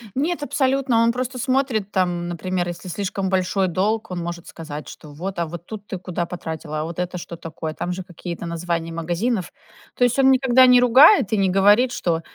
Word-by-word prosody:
Нет, 305 +4 -1
абсолютно. 265 -4 +1
Он 230 - +3
просто 255 +1 -3
смотрит 255 -5 0
там, 175 -3 0
например, 175 +1 -2
если 175 +1 -7
слишком 195 +1 -3
большой 190 0 +1
долг, 210 +5 -1
он 180 - -3
может 170 0 -6
сказать, 150 -2 -8
что 150 - -12
вот: 180 +4 -5
"А, 170 - +1
вот 170 +1 -8
тут 210 0 -9
ты 190 - -4
куда 180 -2 -3
потратила? 160 -3 -5
А, - - -2
вот 165 +2 -6
это 180 0 -3
что 170 0 -7
такое?" 160 -1 -6
Там 180 +3 -3
же 185 +1 -5
какие-то 175 -1 -7
названия 170 0 -3
магазинов. 175 +5 -2 0.4
То - - +1
есть, 245 +2 +2
он 265 0 +6
никогда 260 -1 +5
не 250 -1 +6
ругает 260 - +6
и 215 - +3
не 195 -1 +2
говорит, 205 +6 +4
что 170 -8 -1
185 Hz, 205 wpm, -22 LUFS, 170-240 Hz, 0.4 s, он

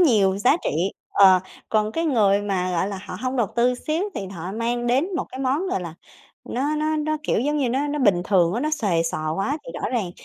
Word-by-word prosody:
nhiều 205 - +4
giá 250 +9 +4
trị, - - +1 0.4
ờ, 190 -2 +6 0.3
còn 215 0 +1
cái 330 - -1
người 205 -9 +3
mà, 190 -3 -1
gọi 175 +3 0
là, 195 -2 -5
họ - - -6
hông 255 +1 -1
đầu 235 -4 +2
tư 245 +1 +3
xíu, 310 +7 -2
thì 195 - -4
họ 185 0 -6
mang 240 +2 -2
đến 260 +8 +2
một - - -1
cái 260 - -9
món, 280 +8 0
gọi 190 - -1
là, 170 -2 -7 0.5
nó 285 +5 -1
nó 310 +1 0
nó, 310 0 -1
kiểu 230 - +1
giống 295 +3 0
như, 260 -4 +1
nó 270 +4 0
nó 295 +1 -2
bình 200 -9 +3
thường 180 -3 +3
á, 240 - -1
nó 305 +1 0
xuề 195 - +1
xoà 155 -1 -2
quá, 230 - -1
thì - - -8
rõ - - 0
ràng 215 -8 -1
235 Hz, 245 wpm, -23 LUFS, 195-290 Hz, 0.5 s, ờ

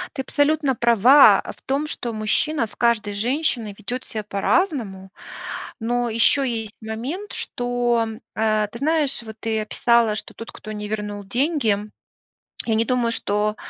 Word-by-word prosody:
Ты 265 - -2
абсолютно 290 0 +1
права 235 +4 +6 0.2
в - - -24
том, 280 +3 -1
что 240 -5 -3
мужчина 225 +6 0
с 210 - -12
каждой 225 -3 +1
женщиной 240 -1 -1
ведет 245 +4 -5
ся 215 -1 -5
по-разному, 200 - -1 0.7
но 240 +1 0
ещё 230 +5 +3
есть 225 -4 -3
момент, 255 - -5
что, 245 -2 0 0.3
а, 215 -1 +1
ты 235 - -9
знаешь, 290 -2 +1
вот 220 -1 -10
ты 220 -1 -1
описала, 230 0 +2
что - - -7
тот, 230 - -9
кто 215 - -9
не 210 0 -5
вернул 210 -1 -4
деньги, 240 - +1 0.9
я 225 - +1
не 225 +1 +2
думаю, 240 -1 +1
что 210 -1 0
230 Hz, 150 wpm, -22 LUFS, 215-265 Hz, 0.9 s, права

